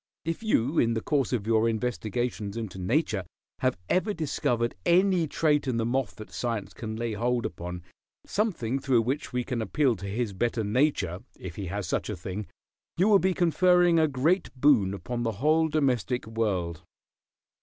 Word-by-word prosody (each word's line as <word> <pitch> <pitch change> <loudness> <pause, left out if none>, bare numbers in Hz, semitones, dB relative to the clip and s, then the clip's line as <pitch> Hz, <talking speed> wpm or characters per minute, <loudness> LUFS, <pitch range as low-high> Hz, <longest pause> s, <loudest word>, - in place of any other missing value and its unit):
If 165 +4 -2
you 160 - +1
in 115 0 +2
the 110 - -1
course 140 -4 +1
of 115 -5 -1
your 115 0 +3
investigations 115 -2 -2
into 110 -4 -5
nature 105 - 0 0.4
have 130 -6 +1
ever 200 +3 +1
discovered 120 -7 0
any 180 -1 +3
trait 150 -1 +1
in 125 -3 0
the 115 - 0
moth 125 -1 -1
that 110 - -10
science 115 -4 -3
can 110 -1 -5
lay 115 0 -2
hold 120 +3 0
upon, 90 +1 -5 0.4
something 150 - -1
through 130 -4 +2
which 135 +5 -2
we 125 -1 -1
can 120 -2 -3
appeal 130 +2 +1
to 100 - -7
his 105 +1 -2
better 115 +3 0
nature, 105 - +1 0.2
if 90 -3 -8
he 100 - -5
has 100 +2 -3
such - - -2
a 105 - -2
thing, 95 +4 -5 0.5
you 190 +5 +4
will 200 -2 +7
be 190 -1 +1
conferring 175 0 +4
a 160 - +4
great 155 +7 +1
boon 115 -9 +4
upon 120 +4 -4
the 115 -1 -1
whole 155 +9 +3
domestic 130 - 0
world. 95 -7 -2
120 Hz, 175 wpm, -27 LUFS, 110-150 Hz, 0.5 s, will